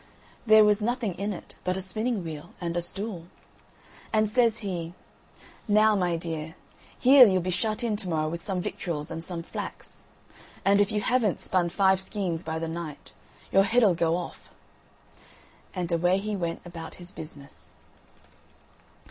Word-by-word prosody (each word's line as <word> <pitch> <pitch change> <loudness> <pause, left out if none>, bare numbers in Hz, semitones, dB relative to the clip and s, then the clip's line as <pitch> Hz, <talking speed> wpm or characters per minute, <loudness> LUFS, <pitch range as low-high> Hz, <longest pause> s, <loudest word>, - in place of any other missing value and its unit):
There 215 0 +8
was 210 0 +3
nothing 235 -2 -1
in 200 +4 -3
it 190 - -8
but 185 0 0
a - - -3
spinning 215 +2 -1
wheel 160 0 -8
and 170 -1 -3
a 175 - +1
stool. 190 0 -4 0.9
And 215 0 +3
says 230 0 +2
he: 175 -3 -4 0.7
"Now, 215 +1 +5
my 175 -3 +1
dear, 160 -1 -5 0.4
here 260 -1 +8
you'll 185 -2 +2
be 185 - -1
shut 215 +5 -1
in 225 -3 0
to 195 -4 -4
morrow 155 -2 0
with 170 +2 -4
some 185 -1 -1
victuals 150 -3 -4
and 165 0 -5
some 170 -1 -5
flax, - - -7 0.6
and 200 +1 +5
if 205 - +2
you 210 -1 0
haven't 230 -3 +1
spun 180 -2 +1
five 190 +1 +3
skeins 190 -4 -2
by 160 -2 -4
the 165 0 -3
night, 160 -2 -7 0.4
your 195 - +6
head'll 220 -1 +4
go 165 0 +1
off." 180 - -6 1.3
And 180 -2 -2
away 175 +2 +3
he 210 +1 -2
went 170 -3 -3
about 165 -2 -8
his 175 0 -6
business. 145 -5 -9
185 Hz, 165 wpm, -27 LUFS, 170-210 Hz, 1.3 s, There